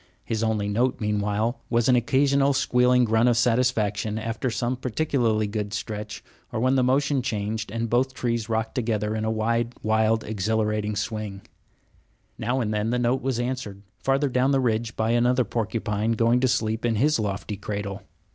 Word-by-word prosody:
His 110 -2 -2
only 110 -2 0
note, 120 +5 0
meanwhile, 105 +2 -1
was 120 -1 +2
an 130 - +5
occasional 135 +3 +3
squealing 125 -1 +3
grunt 115 +2 +3
of 120 - +2
satisfaction 110 -3 +1
after 115 +3 -2
some 120 +2 -1
particularly 125 -4 0
good 105 0 -3
stretch, 105 0 -5 0.3
or - - -2
when 130 +3 +2
the 135 - +3
motion 135 +2 +2
changed 105 -2 -3
and 115 +2 -2
both 130 +3 +1
trees 115 -2 -2
rocked 110 0 -1
together 110 -4 -1
in 110 0 -2
a - - 0
wide, 115 +2 0
wild, 110 +1 +2
exhilarating 105 0 -1
swing. 100 -1 -4 1.0
Now 120 +4 0
and 110 -2 -1
then 105 +1 0
the 125 - +1
note 120 +2 +1
was 130 -3 -1
answered, 120 -6 -4 0.2
farther 135 +2 +1
down 130 +1 +2
the 135 -1 +3
ridge, 115 -2 -1
by 110 +1 0
another 125 +2 +3
porcupine 110 -1 -1
going 115 +2 +3
to 130 - +2
sleep 110 -1 0
in 120 -1 +1
his 145 +5 +2
lofty 105 0 -3
cradle. 100 -1 -5
115 Hz, 175 wpm, -25 LUFS, 105-125 Hz, 1.0 s, an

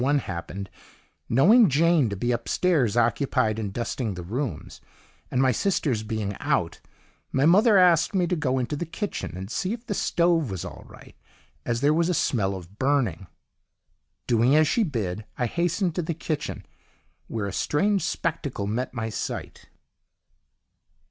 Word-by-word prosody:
1 140 +3 +3
happened, 95 -3 -5 0.6
knowing 195 - +6
Jane 155 -2 +3
to 100 - -3
be 120 +5 -1
upstairs 125 - +1
occupied 115 -1 +1
in 105 -2 -3
dusting 115 0 -3
the 90 - -6
rooms, 110 - -5 0.5
and 125 - -1
my 130 -1 +4
sisters 135 - 0
being 110 -2 -3
out, - - -1 0.5
my 135 +2 +2
mother 205 +6 +6
asked 180 0 +4
me 180 -2 +3
to 180 - 0
go 135 -5 0
into 130 +3 -2
the 170 +3 -4
kitchen 170 - -5
and 95 +3 -7
see 185 - -1
if 235 +1 -8
the 210 - -2
stove 170 - +1
was 95 -3 -5
all - - -9
right - - -15 0.5
as 120 0 -1
'there 145 +2 +4
was 170 +2 +1
a 180 - +1
smell 100 -9 0
of 95 +2 -11
burning.' 125 - 0 1.0
"Doing 120 +4 +3
as 155 0 +5
she 235 - +1
bid, 110 - -2
I 120 - 0
hastened 175 - 0
to 180 - -1
the 165 -1 -3
kitchen, 155 -2 -4 0.6
where 110 -3 -3
a 100 - -4
strange 195 +6 +1
spectacle 145 -10 -2
met 120 +6 -3
my 110 -1 -2
sight. - - -6
130 Hz, 160 wpm, -25 LUFS, 110-170 Hz, 1.0 s, knowing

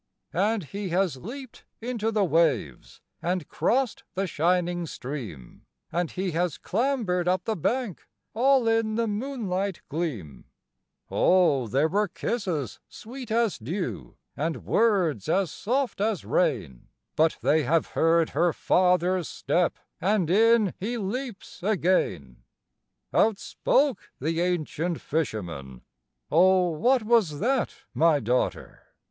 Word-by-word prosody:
And 205 +3 +1
he 195 +5 -5
has 175 -4 +1
leaped 250 - -9 0.2
into 230 -2 -2
the 215 -2 +1
waves, 155 - 0 0.2
and 175 -2 -1
crossed 255 -1 0
the 195 +1 0
shining 175 +1 0
stream, 115 - -8 0.2
And 170 0 -1
he 185 0 -3
has 170 -1 -1
clambered 215 -6 0
up 185 0 +1
the 220 +1 -1
bank, 225 - -2 0.3
all 260 +1 +3
in 225 -1 +1
the 230 +1 +1
moonlight 205 -5 -3
gleam; 135 - -4 0.7
Oh 165 -9 +3
there 135 +8 +2
were 205 +5 +1
kisses 175 - -3
sweet 250 +2 -9
as 225 -2 +1
dew, 170 - -4 0.2
and 160 +2 -3
words 185 - +2
as 190 -3 +1
soft 250 -1 -1
as 215 -3 0
rain, 110 - -1 0.3
But 160 +1 +3
they 155 +1 +4
have 155 +4 +1
heard 165 0 +2
her 170 -1 +2
father's 180 -1 +2
step, 175 -1 0 0.2
and 185 -3 +1
in 220 0 +4
he 235 +5 -2
leaps 230 0 -5
again! 170 - 0 0.7
Out 220 -2 +3
spoke 275 +4 0
the 165 +4 -1
ancient 175 -1 -1
fisherman, 85 - -4 0.5
"Oh, 180 +2 +4
what 240 +10 +2
was 210 -10 +2
that, 260 - 0 0.2
my 160 -2 +4
daughter?" 125 +1 -1
180 Hz, 125 wpm, -26 LUFS, 160-220 Hz, 0.7 s, they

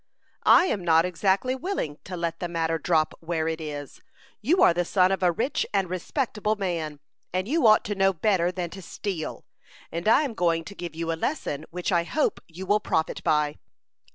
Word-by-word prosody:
"I 360 - +8
am 205 - -1
not 165 0 +4
exactly 190 +7 +1
willing 260 - -3
to 180 -1 -6
let 170 -1 -3
the 175 - -2
matter 165 -1 -1
drop 155 -1 +1
where 165 -1 -2
it 160 0 -2
is. 145 -2 -7 0.4
You 320 - +3
are - - +6
the 175 +1 +1
son 185 +1 +3
of 195 - -1
a 180 -1 +4
rich 235 - -1
and 190 -3 +1
respectable 215 - -1
man, 165 -7 -3 0.3
and 185 +2 -1
you 295 -2 +3
ought 215 0 +5
to 205 - -1
know 195 -1 +3
better 180 -1 +1
than 175 -2 -4
to 195 - -9
steal; 180 -3 -5 0.5
and 170 +4 -4
I 250 +7 +6
am 275 -6 -3
going 170 -4 +1
to 200 - -9
give 175 -4 -7
you 165 0 -2
a - - +1
lesson 160 - -3
which 180 +3 -3
I 170 -2 +3
hope 295 - 0
you 175 +3 -8
will 205 +2 +3
profit 160 -6 -1
by." 150 -1 +1
180 Hz, 205 wpm, -26 LUFS, 165-205 Hz, 0.5 s, I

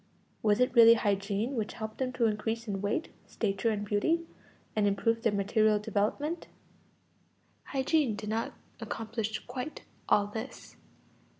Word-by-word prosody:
Was 210 0 +3
it 250 - +3
really 230 -1 +9
hygiene 205 +3 0
which 220 -3 -2
helped 220 -1 -6
them 255 -1 0
to 240 - +1
increase 225 +2 -1
in 195 -2 -2
weight, 205 +11 -1 0.2
stature, 200 +1 0
and 210 -2 -1
beauty, 325 - +1 0.5
and 210 -1 +3
improved 225 +3 +1
their 225 - +2
material 210 +2 +3
development? 220 - -1 1.2
Hygiene 270 -3 +1
did 210 0 -6
not 225 +1 -1 0.3
accomplish 220 -1 -4
quite 255 +4 -6 0.3
all 205 - +5
this. 220 +5 -7
220 Hz, 135 wpm, -30 LUFS, 205-240 Hz, 1.2 s, really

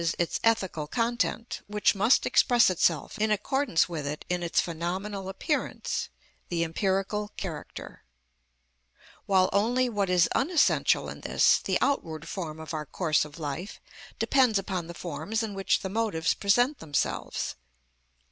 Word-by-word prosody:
_, 165 -1 0
its 175 - -1
ethical 190 -9 +1
content, 235 +3 -1
which 210 0 +2
must 215 +6 +3
express 240 -5 +4
itself 165 +2 0
in 215 +1 +2
accordance 215 - +1
with 160 -5 -4
it 150 +1 -5
in 180 0 0
its 170 -2 +1
phenomenal 185 +4 -3
appearance, 295 - -2 0.4
the 170 -1 0
empirical 195 +5 -1
character; 170 -6 -7 1.2
while 190 -2 +4
only 240 +6 +2
what 205 -4 -1
is 180 -2 +4
unessential 320 +4 +2
in - - -8
this, - - +4
the - - 0
outward 160 - -1
form 160 -5 -5
of 160 +1 -7
our 155 -2 -4
course 155 -2 +1
of 150 -1 -12
life, 160 +6 -5 0.4
depends 255 -6 +3
upon 185 -3 -3
the 170 - -8
forms 210 +7 -3
in 215 -2 -4
which 195 0 +1
the - - -3
motives 195 -5 0
present 245 +8 +2
themselves. 150 -3 -2
190 Hz, 145 wpm, -27 LUFS, 165-220 Hz, 1.2 s, express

